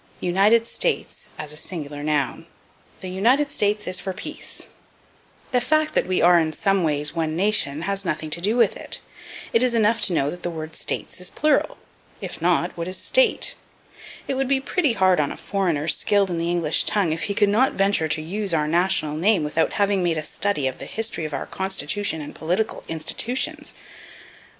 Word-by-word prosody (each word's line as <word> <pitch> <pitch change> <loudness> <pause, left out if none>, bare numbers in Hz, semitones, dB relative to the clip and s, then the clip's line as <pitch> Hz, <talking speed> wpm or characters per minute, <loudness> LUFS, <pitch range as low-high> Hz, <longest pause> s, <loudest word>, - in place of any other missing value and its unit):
United 200 +6 +3
States - - -2
as 150 0 -5
a - - -8
Singular 150 -3 -5
Noun. 145 -3 -1 0.5
"The 185 - -6
United 245 +10 +2
States 210 0 0
is 185 0 0
for 190 - -4
peace." - - -5 0.9
The 250 -2 +2
fact 310 +4 +1
that - - +2
we 185 -2 +1
are 175 0 +6
in 160 -1 -1
some 195 +1 +1
ways 150 -1 0
one 160 -2 -2
nation 170 -6 +1
has 195 +1 -1
nothing 155 -3 -3
to 170 - +1
do 210 +5 +1
with 240 - +3
it; - - -1 0.5
it 230 - +4
is 250 -2 +3
enough 225 0 +2
to 190 - +2
know 145 -3 +1
that 175 - -9
the - - -3
word 160 -1 -7
States - - -4
is 180 - -2
plural 300 -1 +1 0.4
if - - -7
not, - - +1
what 170 0 -4
is 185 0 -2
State? - - +2 0.7
It - - -1
would 270 0 -1
be 270 0 +2
pretty 290 0 0
hard 185 -4 +3
on 145 - 0
a - - -7
foreigner 175 -7 -1
skilled 200 +3 +2
in 170 - -2
the 170 +1 -1
English 170 -3 +2
tongue 190 -7 +1
if 165 - -3
he 200 - -2
could 205 - +4
not 240 +6 +3
venture 195 -5 +2
to 155 0 0
use 195 +2 -2
our 150 -1 +1
national 165 -2 +1
name 180 +1 +2
without 155 +2 0
having 200 -2 +1
made 170 -2 0
a 155 - -2
study 180 -2 -1
of 130 - -2
the - - -7
history 220 -7 -2
of 155 - -6
our 135 - -4
Constitution 190 -2 -1
and 145 - -8
political 180 +7 -2
institutions. 165 +10 -2
185 Hz, 200 wpm, -23 LUFS, 160-210 Hz, 0.9 s, are